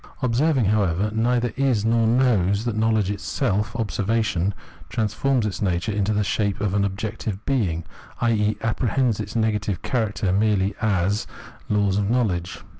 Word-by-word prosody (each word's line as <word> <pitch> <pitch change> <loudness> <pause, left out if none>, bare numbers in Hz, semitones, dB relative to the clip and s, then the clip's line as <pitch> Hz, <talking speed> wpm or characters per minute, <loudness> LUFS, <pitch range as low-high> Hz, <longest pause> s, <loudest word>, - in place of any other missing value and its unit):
Observing, 130 +1 +2
however, 100 -1 +1
neither 120 +1 +1
is 130 -6 +1
nor 115 0 +3
knows 110 -4 +2
that 120 -3 -1
knowledge 110 -3 +1
itself; 105 +2 -1
observation 110 -4 0 0.4
transforms 115 +3 0
its 105 +3 -3
nature 95 +1 0
into 100 0 0
the 105 0 +1
shape 100 0 -1
of 105 -2 -1
an 100 0 +2
objective 105 +1 -4
being, 95 -12 0 0.4
i.e. 110 -3 +1
apprehends 115 0 0
its 105 +1 -5
negative 105 -4 0
character 110 -6 -1
merely 100 -1 +2
as 100 -1 +1 0.4
laws 100 -2 +2
of 100 0 0
knowledge. 95 -8 -1
105 Hz, 140 wpm, -23 LUFS, 100-115 Hz, 0.4 s, nor